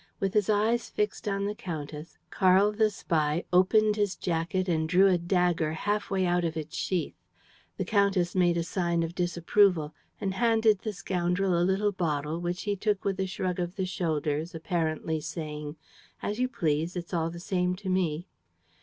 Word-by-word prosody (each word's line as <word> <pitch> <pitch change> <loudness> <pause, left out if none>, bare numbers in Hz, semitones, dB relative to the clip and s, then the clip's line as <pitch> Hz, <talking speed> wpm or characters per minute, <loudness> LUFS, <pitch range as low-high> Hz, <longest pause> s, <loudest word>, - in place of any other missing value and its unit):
With 195 0 -1
his 210 -1 +2
eyes 220 +3 +2
fixed 210 +1 -2
on 200 -1 0
the 205 - -1
countess, 155 -5 -7
Karl 190 +2 +4
the 215 0 +2
spy 160 -5 0
opened 210 +4 +4
his 205 -2 0
jacket 175 +2 -1
and 160 -2 0
drew 185 +3 +5
a 185 -3 +4
dagger 175 -3 +1
half 205 +5 -1
way 190 -1 +1
out 175 0 +1
of 165 -1 -2
its 155 -1 -6
sheath. 180 -3 -1 0.6
The - - -2
countess 200 -4 +2
made 175 -2 +3
a 170 - 0
sign 170 -1 0
of 165 +1 -4
disapproval 175 -2 +2 0.3
and 195 -1 -2
handed 220 -1 +3
the 215 - -3
scoundrel 180 -1 0
a 170 - +2
little 190 +3 +2
bottle 155 -4 -2
which 175 +1 -3
he 205 -1 -1
took 205 0 -1
with 195 -1 -1
a 190 - 0
shrug 185 -1 -3
of 175 +1 -3
the 190 - -1
shoulders, 160 -3 -2
apparently 160 -1 -1
saying: 150 -1 -5 0.5
"As 210 +3 -2
you 255 - +2
please! 160 - -1
It's 175 +1 -6
all 165 -1 0
the 170 +1 -8
same 180 0 0
to 190 +1 -9
me!" 180 -2 0
180 Hz, 180 wpm, -28 LUFS, 165-195 Hz, 0.6 s, drew